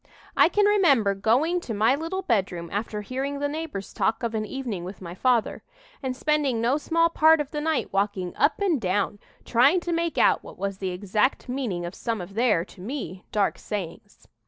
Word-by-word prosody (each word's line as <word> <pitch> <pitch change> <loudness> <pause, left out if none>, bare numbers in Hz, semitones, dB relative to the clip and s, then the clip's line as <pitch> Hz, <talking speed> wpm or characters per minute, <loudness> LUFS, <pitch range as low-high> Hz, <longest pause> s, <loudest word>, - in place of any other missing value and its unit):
"I - - +6
can 415 -1 +3
remember 295 - +4
going 250 - +2
to 230 -9 -5
my 220 +5 +4
little 330 +6 -3
bedroom, 190 - -1
after 210 +1 -3
hearing 270 +5 -3
the 285 0 -1
neighbors 290 -10 -5
talk 225 - 0
of 230 -1 -1
an 215 -1 -2
evening 235 -9 -4
with 185 +2 -8
my 175 -2 -8
father, 235 +3 +1 0.4
and 260 -2 -3
spending 295 -6 +1
no 240 +5 +2
small 330 +2 +2
part 320 -1 +5
of 295 -2 -3
the 300 - -3
night 315 -1 -1
walking 195 -2 -1
up 290 0 +2
and 360 - +1
down, 200 +2 0 0.3
trying 265 +10 +4
to 345 0 -2
make 335 0 -1
out - - +4
what - - -12
was 195 -1 -3
the 190 - -2
exact 205 +9 0
meaning 240 -10 -3
of 175 - -6
some 230 +1 -3
of 180 +2 -8
their, 215 -6 +2
to 190 - -15
me, 195 - -6
dark 205 -2 +1
sayings. 205 +1 -7
230 Hz, 200 wpm, -25 LUFS, 200-295 Hz, 0.4 s, I